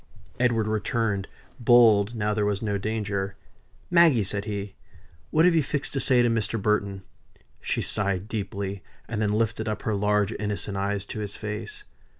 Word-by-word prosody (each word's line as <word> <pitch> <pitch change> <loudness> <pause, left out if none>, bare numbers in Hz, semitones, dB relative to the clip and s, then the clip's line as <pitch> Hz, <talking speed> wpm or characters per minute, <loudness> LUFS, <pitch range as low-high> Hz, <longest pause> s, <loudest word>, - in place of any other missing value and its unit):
Edward 120 -3 +2
returned, 110 -2 -1 0.3
bold 115 -3 +5
now 105 -1 0
there 105 0 0
was 105 +1 -1
no 100 -2 -1
danger. 100 -2 -2 0.6
"Maggie!" 165 - +5
said 100 +1 -3
he, 100 -2 -4 0.6
"what 160 +2 +4
have 180 - +5
you 165 - +4
fixed 145 +1 -2
to 135 - 0
say 125 -2 +4
to - - +3
Mr. 115 -1 0
Burton?" 100 -1 0 0.6
She - - -1
sighed 100 -1 0
deeply; 100 -2 -4 0.3
and 110 -2 -3
then 105 -1 +1
lifted 110 0 0
up 105 -1 -3
her 110 - 0
large 105 +1 +1
innocent 105 -1 -3
eyes 100 0 -1
to 110 - -6
his 105 -1 -4
face. 110 - -6
105 Hz, 165 wpm, -26 LUFS, 100-115 Hz, 0.6 s, bold